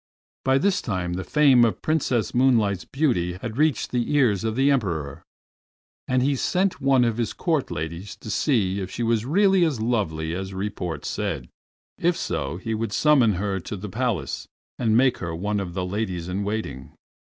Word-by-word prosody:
By 135 0 +3
this 195 +7 +1
time 90 -5 -2
the 95 +1 -3
fame 140 -3 +5
of 115 - 0
Princess 130 -7 0
Moonlight's 115 -7 +2
beauty 120 - 0
had 110 +5 -6
reached 155 -2 +1
the 120 +1 -1
ears 115 -10 +3
of 110 -1 -1
the 135 +3 +3
Emperor, 85 - -1 0.9
and 130 0 +2
he 140 +1 +2
sent 185 +8 0
one 135 -2 +4
of 115 -1 0
the 120 -2 -1
Court 160 -6 0
ladies 85 +6 -5
to 110 - -8
see 100 -9 +1
if 95 -2 -4
she 120 - -4
were 115 0 +3
really 185 - +3
as 155 -8 0
lovely 85 -9 -1
as 95 +1 -5
report 90 -6 -4
said; - - -3 0.5
if 175 0 +2
so 70 +1 -3
he 110 +5 -4
would 110 -1 -2
summon 135 -5 +4
her 95 +1 -2
to 100 +4 -6
the 100 +2 -7
Palace 120 +2 -2 0.3
and 115 -2 +3
make 130 0 +3
her 85 -2 -4
one 105 +4 -1
of 90 -3 -5
the 95 -1 -1
ladies 90 -3 -3
in 95 +3 -2
waiting. 105 -10 -4
110 Hz, 185 wpm, -24 LUFS, 95-130 Hz, 0.9 s, fame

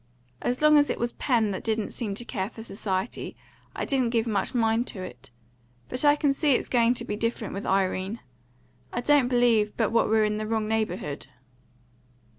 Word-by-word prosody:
As 250 +4 -1
long 305 -1 +7
as 290 - +2
it - - -1
was 235 0 -1
Pen 230 -6 +1
that 190 - -4
didn't 220 -1 -1
seem 210 -5 -3
to 240 - -6
care 195 -5 -3
for 225 -1 -10
society, 195 -1 -3 0.4
I - - -2
didn't 260 -4 +1
give 230 -1 +1
much 215 +1 -1
mind 230 +1 +2
to 185 - -4
it. 150 -9 -10 0.6
But 255 - -3
I 290 0 +6
can 290 -2 +2
see 290 0 +2
it's - - -2
going 240 0 +3
to 235 -1 -3
be 210 - -3
different 230 -1 -2
with 200 - -5
Irene. 190 +2 0 0.7
I 240 - -2
don't 285 -1 +4
believe 240 -4 +2
but 225 -3 +1
what 230 -1 +2
we're 220 0 +4
in 210 0 -1
the 215 0 -3
wrong 220 -1 -1
neighbourhood." 200 -9 -2
225 Hz, 200 wpm, -26 LUFS, 210-245 Hz, 0.7 s, long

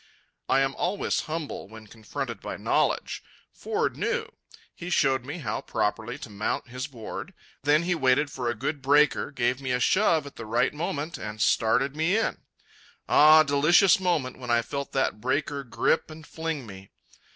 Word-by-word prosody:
I 135 - +4
am 135 0 +1
always 190 +3 0
humble 155 -2 -4
when 110 +1 -12
confronted 110 0 -6
by - - -5
knowledge. - - 0 0.3
Ford 445 +1 -2
knew. 470 -3 -1 0.5
He 175 - -7
showed 135 -6 +2
me 145 +5 -5
how 120 -11 -3
properly 110 +4 -2
to 140 - -9
mount 105 +4 -3
his 125 +3 -5
board. 120 -7 -8 0.3
Then 150 +3 +3
he 180 +1 +1
waited 145 -1 +2
for 125 -3 -3
a 120 - -2
good 145 +6 -3
breaker, 145 +2 +3
gave 125 -1 -1
me 130 - -4
a 125 - +1
shove 165 - +3
at 140 - -11
the 115 - -7
right 115 +2 +1
moment, 150 +1 -4
and 105 0 -6
started 125 +6 +2
me 160 +6 +2
in. 225 - -1 0.7
Ah, 155 +1 +7
delicious 155 +8 +4
moment 160 -10 -1
when 125 -1 -8
I 120 0 +3
felt 140 +4 -5
that 135 -5 0
breaker 140 +3 -1
grip 135 +6 0
and 155 0 -11
fling 160 -5 -4
me. 95 -2 -11
140 Hz, 175 wpm, -26 LUFS, 120-160 Hz, 0.7 s, Ah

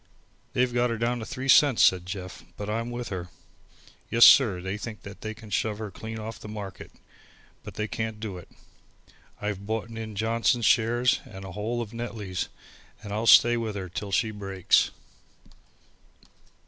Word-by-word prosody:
"They've 125 -1 +1
got 120 0 +2
her 115 - -2
down 120 +2 0
to 110 - -6
three 130 +3 -5
cents," 135 -2 +6
said 90 -1 +4
Jeff, 90 -1 -7
"but 105 +1 -4
I'm 115 +2 -2
with 120 0 -5
her. 90 -2 -5 0.8
Yes, 115 0 +7
sir, 110 -10 +7
they 95 +2 -4
think 110 0 -7
they 100 +2 -7
can 110 -2 -13
shove 105 +2 0
her 110 -2 -6
clean 110 +4 -7
off 110 +1 -7
the - - -10
market, 100 -3 -7 0.7
but - - -10
they 105 0 -2
can't 110 -1 -4
do 105 -5 -5
it. - - -15 0.9
I've 100 -1 -4
boughten 110 +1 -3
in 110 -2 -6
Johnson's 115 +2 +1
shares, 120 +1 +3
and 95 -7 -10
the 95 - -8
whole 115 +5 -2
of 110 0 -11
Netley's, 110 -6 -4 0.5
and 100 -1 -6
I'll 110 +2 -1
stay 120 +3 +7
with 110 -3 -3
her 95 -2 -5
till 100 +3 -5
she 110 +3 +1
breaks." 95 -3 +2
110 Hz, 175 wpm, -27 LUFS, 100-115 Hz, 0.9 s, Yes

